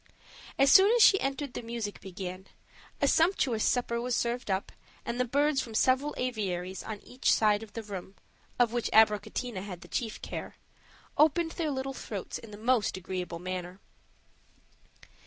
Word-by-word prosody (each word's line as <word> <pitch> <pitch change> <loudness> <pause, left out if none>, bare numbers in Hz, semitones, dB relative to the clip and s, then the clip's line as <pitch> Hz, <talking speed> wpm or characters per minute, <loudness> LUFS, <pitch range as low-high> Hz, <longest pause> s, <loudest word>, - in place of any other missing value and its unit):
As 275 0 +5
soon 390 +3 +8
as 475 - +6
she 390 - +6
entered 275 0 -2
the - - -4
music 230 -3 -5
began, 185 0 -7 0.5
a - - +2
sumptuous 310 - +2
supper 235 -1 +1
was 245 0 -1
served 235 -1 -1
up, 190 0 -1 0.3
and 235 +1 -3
the 250 - +2
birds 285 +2 +2
from 225 -3 -8
several 265 +5 +2
aviaries 190 -7 -3
on 215 -2 -7
each 250 +1 0
side 210 -1 +3
of 220 -2 -11
the 230 - -5
room, 195 -2 -8 0.4
of 240 -2 +3
which 240 -1 -1
Abricotina 215 0 +2
had 185 -3 -8
the 175 - -12
chief 225 +3 -3
care, - - -6 0.6
opened 325 +2 +4
their 325 -3 -2
little 270 -1 -3
throats 205 -7 -6
in 230 - -12
the 205 - -10
most 225 -2 +1
agreeable 180 -2 -4
manner. 180 +1 -5
230 Hz, 165 wpm, -29 LUFS, 195-265 Hz, 0.6 s, soon